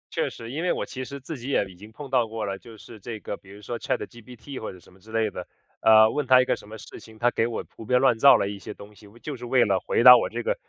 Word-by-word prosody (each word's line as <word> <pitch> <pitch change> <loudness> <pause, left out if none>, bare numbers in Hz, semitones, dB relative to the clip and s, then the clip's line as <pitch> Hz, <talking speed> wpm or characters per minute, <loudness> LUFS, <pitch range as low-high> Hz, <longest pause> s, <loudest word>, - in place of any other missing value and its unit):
确 - - 0
实， 115 0 -10
因 150 +5 -4
为 180 - 0
我 - - -3
其 130 -2 -7
实 140 +2 -8
自 140 +1 -8
己 125 +4 -7
也 120 - +1
已 95 - -14
经 105 +5 -14
碰 140 +3 -10
到 125 -3 +2
过 110 -1 -5
了， 100 -1 -4
就 115 -2 -14
是 110 0 -13
这 110 +2 -7
个 100 - -6
比 95 - -20
如 100 +1 -13
说 120 +3 -5
ChatGPT 120 +4 -6
或 110 - -6
者 95 - -14
什 90 - -21
么 95 - -21
之 110 +3 -16
类 110 -2 0
的， 90 -1 -8 0.3
呃， 110 0 +7
问 150 0 -2
它 130 -1 +7
一 130 - +3
个 - - +1
什 105 - -15
么 110 - -9
事 - - -12
情， 110 -1 -16
它 120 +2 +2
给 115 - 0
我 120 - -5
胡 - - -10
编 125 +3 +2
乱 125 -4 +3
造 140 +3 +8
了 - - -1
一 100 0 -6
些 105 - -9
东 105 +1 -13
西， 105 0 -17 0.2
就 150 - -5
是 125 -1 -9
为 120 0 +3
了 100 -3 +1
回 - - 0
答 125 0 +11
我 120 - +1
这 120 +1 -5
个 - - 0
115 Hz, 375 characters per minute, -25 LUFS, 105-125 Hz, 0.3 s, 答